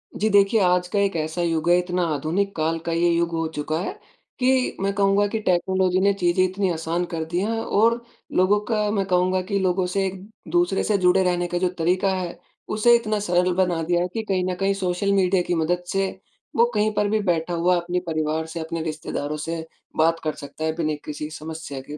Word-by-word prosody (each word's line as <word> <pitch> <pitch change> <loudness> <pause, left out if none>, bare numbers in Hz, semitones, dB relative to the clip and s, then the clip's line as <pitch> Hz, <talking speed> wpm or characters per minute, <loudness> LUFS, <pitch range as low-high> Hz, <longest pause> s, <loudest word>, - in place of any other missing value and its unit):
जी 215 - +1
देखिए, 200 +2 +4
आज 180 -1 +2
का 200 +3 -1
एक 200 -2 +1
ऐसा 160 +2 -2
युग 165 -1 0
है, 175 - +6
इतना 180 0 -1
आधुनिक 185 +8 -1
काल 160 +1 0
का 170 - -1
ये 170 +1 +2
युग 170 0 +1
हो 165 -1 -1
चुका 155 +2 -2
है। 380 - -5 0.4
कि 255 0 +2
मैं 195 0 0
कहूँगा 200 +1 +3
कि 220 +2 -2
टेक्नोलॉज़ी 185 0 +1
ने 200 +1 +4
चीज़ें 180 -1 +2
इतनी 190 +1 0
आसान 165 +2 -2
कर 160 -1 -1
दी 170 +2 -2
हैं। 225 +3 -1
और 230 +2 +2 0.4
लोगों 190 +3 +4
का 210 -2 0
मैं 200 -2 0
कहूँगा 185 0 +2
कि 200 +2 -2
लोगों 185 -1 +1
से 195 -1 +1
एक-दूसरे 185 -2 -2
से 210 - +2
जुड़े 185 0 +4
रहने 175 -1 0
का 175 - -2
जो 180 0 +1
तरीका 185 +4 +2
है। 180 -2 -4 0.4
उसे 235 +3 +5
इतना 215 -3 0
सरल 180 -2 +1
बना 180 -3 +1
दिया 175 +1 +1
है 180 - 0
कि 225 - -2
कहीं 185 -2 +1
न 180 - -2
कहीं 195 0 +2
सोशल 195 0 -1
मीडिया 190 -1 +3
की 175 - +1
मदद 175 +2 0
से 195 0 +1 0.5
वो 235 - +5
कहीं 210 +1 +2
पर 210 0 +1
भी 215 +1 +1
बैठा 175 -4 0
हुआ 175 +2 +2
अपने 175 +1 -2
परिवार 155 0 -1
से, 160 +1 -6
अपने 165 +1 -4
रिश्तेदारों 155 -2 -4
से 165 +1 -4 0.3
बात 165 +1 +3
कर 155 -1 -1
सकता 145 +2 -8
है, 160 - +1
बिना 155 -2 -1
किसी 150 0 -5
समस्या 160 -3 -7
के। 150 - -6
180 Hz, 220 wpm, -23 LUFS, 165-195 Hz, 0.5 s, है